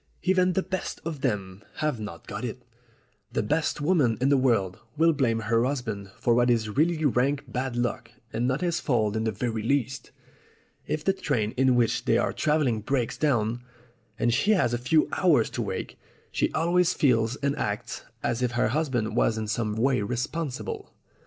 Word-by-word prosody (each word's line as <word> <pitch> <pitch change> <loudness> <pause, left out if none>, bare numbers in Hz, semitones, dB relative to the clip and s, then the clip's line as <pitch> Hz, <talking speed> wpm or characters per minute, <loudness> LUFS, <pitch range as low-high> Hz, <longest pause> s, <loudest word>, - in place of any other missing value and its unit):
Even 185 0 +3
the 190 - +1
best 190 0 -4
of 160 -4 -4
them 100 -6 -2
have 150 -6 -1
not 105 -6 -7
got - - -6
it. - - -5 0.7
The - - 0
best 150 0 0
woman 145 -8 +2
in 130 +2 +2
the 140 - +5
world 115 -9 +1 0.2
will 165 +1 +4
blame 120 -6 +1
her 115 +2 +2
husband 120 -7 -3
for 120 - +2
what 120 +1 +3
is 115 -2 +2
really 160 +1 +2
rank 140 +2 +2
bad 130 0 -3
luck 120 0 -2 0.2
and 120 +2 0
not 130 +4 0
his 175 -1 0
fault 110 -6 +1
in 110 0 -1
the 110 - +1
very 110 +1 -2
least. 135 +2 -1 0.8
If 150 0 -2
the 195 - +2
train 125 - -1
in 130 0 +3
which 120 -2 +1
they - - +3
are - - 0
travelling 145 -8 +1
breaks 120 +1 -1
down, 120 -5 0 0.6
and 120 0 +1
she 205 - +3
has 145 - +2
a 120 - 0
few 150 +6 +3
hours 155 - +3
to - - -3
wait, - - -4 0.3
she - - 0
always 175 +2 +2
feels 115 -4 +2
and 140 0 -1
acts 120 -1 -3 0.2
as 120 +1 -1
if 125 -1 0
her 120 -1 +2
husband 125 -5 -1
was 110 - +2
in 110 -1 -3
some 110 0 -1
way 125 +1 +2
responsible." 125 +6 -4
125 Hz, 185 wpm, -26 LUFS, 115-150 Hz, 0.8 s, the